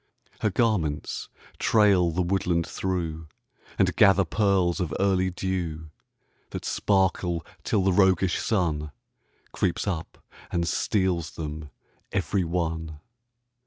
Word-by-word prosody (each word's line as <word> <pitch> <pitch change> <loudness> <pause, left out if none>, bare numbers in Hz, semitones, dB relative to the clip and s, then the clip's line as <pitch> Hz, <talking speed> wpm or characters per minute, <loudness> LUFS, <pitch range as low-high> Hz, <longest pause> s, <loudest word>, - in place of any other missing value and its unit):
Her 110 - +1
garments 95 -9 -1 0.3
trail 100 -5 +4
the 85 +2 0
woodland 85 -2 0
through, 85 -5 -3 0.5
And - - +2
gather 95 -1 +5
pearls 95 -1 +1
of 90 -4 -2
early 95 -2 +2
dew 85 -4 -3 0.6
That - - -6
sparkle 95 -4 +1 0.2
till 100 -3 +1
the 95 0 +3
roguish 95 -1 +3
Sun 80 -8 0 0.6
Creeps 90 - -1
up 85 -6 -4 0.3
and 85 -1 0
steals 90 -2 0
them 75 -1 -6 0.4
every 95 -2 0
one. 80 -2 -3
90 Hz, 110 wpm, -26 LUFS, 80-95 Hz, 0.6 s, gather